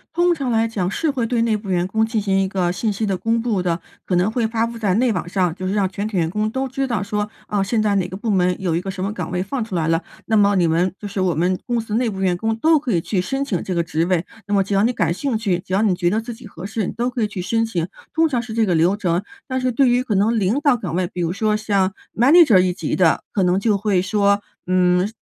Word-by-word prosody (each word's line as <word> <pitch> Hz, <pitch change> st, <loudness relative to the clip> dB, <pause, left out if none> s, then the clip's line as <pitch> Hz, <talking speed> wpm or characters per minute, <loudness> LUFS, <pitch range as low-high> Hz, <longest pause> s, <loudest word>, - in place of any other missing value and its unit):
通 350 Hz, 0 st, +3 dB
常 275 Hz, -6 st, -3 dB
来 225 Hz, 0 st, +2 dB
讲， 195 Hz, -5 st, -2 dB
是 310 Hz, +9 st, 0 dB
会 250 Hz, -4 st, -1 dB
对 230 Hz, -1 st, +1 dB
内 225 Hz, -2 st, +1 dB
部 205 Hz, -1 st, -6 dB
员 175 Hz, -1 st, +1 dB
工 220 Hz, +4 st, +1 dB
进 220 Hz, 0 st, 0 dB
行 195 Hz, -2 st, +1 dB
一 195 Hz, -, +1 dB
个 185 Hz, -2 st, 0 dB
信 210 Hz, +5 st, -1 dB
息 210 Hz, +2 st, -2 dB
的 195 Hz, -2 st, 0 dB
公 225 Hz, +5 st, 0 dB
布 225 Hz, -5 st, 0 dB
的， 175 Hz, -1 st, -1 dB, 0.2 s
可 180 Hz, -, -1 dB
能 180 Hz, +4 st, +2 dB
会 230 Hz, -1 st, 0 dB
发 225 Hz, 0 st, 0 dB
布 230 Hz, 0 st, -6 dB
在 200 Hz, -4 st, +1 dB
内 245 Hz, +2 st, +2 dB
网 180 Hz, -3 st, -3 dB
上。 180 Hz, -3 st, +1 dB
就 185 Hz, +2 st, -5 dB
是 190 Hz, -, -1 dB
让 205 Hz, -2 st, +2 dB
全 195 Hz, +3 st, -4 dB
体 215 Hz, -3 st, -3 dB
员 165 Hz, -2 st, +2 dB
工 210 Hz, +4 st, -1 dB
都 265 Hz, +4 st, -2 dB
知 270 Hz, +1 st, -2 dB
道 225 Hz, -6 st, -1 dB
说， 210 Hz, +1 st, -2 dB, 0.2 s
哦， 205 Hz, -2 st, 0 dB
现 215 Hz, +3 st, 0 dB
在 210 Hz, -1 st, +1 dB
哪 185 Hz, -3 st, +1 dB
个 185 Hz, +1 st, -7 dB
部 220 Hz, +3 st, -4 dB
门 180 Hz, -2 st, +1 dB
有 180 Hz, -4 st, -1 dB
一 170 Hz, -, 0 dB
个 195 Hz, -, -6 dB
什 190 Hz, -1 st, -4 dB
么 200 Hz, +2 st, -2 dB
岗 210 Hz, -, -5 dB
位 180 Hz, 0 st, -1 dB
放 240 Hz, +5 st, -3 dB
出 220 Hz, -4 st, -6 dB
来 160 Hz, -2 st, 0 dB
了， 165 Hz, +1 st, +2 dB, 0.2 s
那 220 Hz, -, +1 dB
么 205 Hz, -1 st, +4 dB
你 175 Hz, -3 st, +3 dB
们 170 Hz, +3 st, +1 dB
就 205 Hz, -, -6 dB
是 200 Hz, -1 st, -3 dB
我 180 Hz, -2 st, +1 dB
们 180 Hz, +3 st, +1 dB
公 240 Hz, -1 st, 0 dB
司 220 Hz, -2 st, -5 dB
内 240 Hz, 0 st, +1 dB
部 195 Hz, -3 st, -6 dB
员 185 Hz, -2 st, +2 dB
工 220 Hz, +5 st, -1 dB
都 315 Hz, +7 st, +3 dB
可 275 Hz, -4 st, -3 dB
以 175 Hz, -, +2 dB
去 185 Hz, +3 st, -1 dB
申 270 Hz, +9 st, -2 dB
请 195 Hz, -11 st, -2 dB
这 185 Hz, -, -3 dB
个 170 Hz, -, +1 dB
职 165 Hz, 0 st, -1 dB
位。 180 Hz, -1 st, 0 dB, 0.2 s
那 205 Hz, -, -2 dB
么 195 Hz, -, +3 dB
只 200 Hz, -, -4 dB
要 195 Hz, -, +3 dB
你 235 Hz, -, +3 dB
感 170 Hz, -8 st, 0 dB
兴 250 Hz, +4 st, -1 dB
趣， 195 Hz, -6 st, 0 dB
只 185 Hz, -, -13 dB
要 195 Hz, -, +3 dB
你 205 Hz, -4 st, +3 dB
觉 175 Hz, -1 st, +1 dB
得 210 Hz, +4 st, +1 dB
自 235 Hz, +2 st, -6 dB
己 230 Hz, 0 st, -12 dB
合 180 Hz, -3 st, -9 dB
适， 205 Hz, -1 st, -2 dB
你 -, -, -3 dB
都 240 Hz, +2 st, -1 dB
可 245 Hz, -, -3 dB
以 215 Hz, -, +2 dB
去 200 Hz, -2 st, -7 dB
申 225 Hz, +5 st, 0 dB
请。 175 Hz, -7 st, -2 dB, 0.3 s
通 325 Hz, 0 st, +3 dB
常 255 Hz, -6 st, -1 dB
是 235 Hz, -2 st, -8 dB
这 225 Hz, -1 st, +3 dB
个 185 Hz, -, +1 dB
流 170 Hz, +4 st, +3 dB
程。 180 Hz, -2 st, 0 dB, 0.2 s
但 260 Hz, -1 st, -2 dB
是 255 Hz, 0 st, +1 dB
对 260 Hz, +3 st, +3 dB
于 245 Hz, +1 st, +3 dB
可 225 Hz, -5 st, -1 dB
能 220 Hz, +4 st, +2 dB
领 210 Hz, +7 st, +1 dB
导 290 Hz, -3 st, +3 dB
岗 185 Hz, -9 st, -4 dB
位， 185 Hz, 0 st, +1 dB
比 175 Hz, -, -5 dB
如 170 Hz, -1 st, 0 dB
说 215 Hz, +3 st, 0 dB
像 200 Hz, -3 st, 0 dB, 0.2 s
manager 265 Hz, -, +6 dB
一 180 Hz, 0 st, +2 dB
级 190 Hz, -, -3 dB
的， 175 Hz, -4 st, +3 dB
可 195 Hz, -, +1 dB
能 180 Hz, +1 st, +2 dB
就 210 Hz, 0 st, +2 dB
会 200 Hz, -2 st, +1 dB
说， 200 Hz, +1 st, +2 dB, 0.2 s
嗯， 180 Hz, 0 st, +2 dB
200 Hz, 345 characters per minute, -21 LUFS, 185-230 Hz, 0.3 s, manager